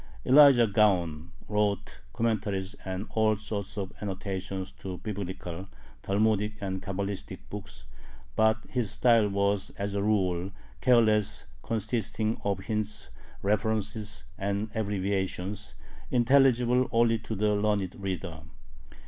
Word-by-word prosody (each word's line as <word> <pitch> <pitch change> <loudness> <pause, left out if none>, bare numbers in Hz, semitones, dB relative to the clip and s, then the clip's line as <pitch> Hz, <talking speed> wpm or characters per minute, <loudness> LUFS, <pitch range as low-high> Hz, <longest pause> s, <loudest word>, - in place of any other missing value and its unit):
Elijah 135 -3 +8
Gaon 90 -7 +2 0.2
wrote 105 -1 -1
commentaries 105 -4 -1
and 95 +2 -4
all 110 -1 +3
sorts 100 -1 -5
of 95 -2 -4
"annotations" 95 -1 -4
to 95 -2 -7
Biblical, 95 -3 -5 0.3
Talmudic, 105 +1 +1
and 95 -2 -3
Cabalistic 100 +1 -4
books, - - -8 0.5
but 110 0 +3
his 120 -5 -1
style 115 -1 +4
was, 100 0 +1
as 100 0 -2
a 100 - 0
rule, 95 -4 +1 0.3
careless, 110 -5 +3 0.2
consisting 110 0 -1
of 100 -2 0
hints, 105 0 -3 0.3
references, 105 0 -1 0.2
and 100 +2 -1
abbreviations, 100 -1 -2 0.3
intelligible 125 0 +4
only 115 -1 +3
to 110 0 -5
the 105 +1 +2
learned 100 -3 0
reader. 90 -4 -4
105 Hz, 110 wpm, -29 LUFS, 95-110 Hz, 0.5 s, Elijah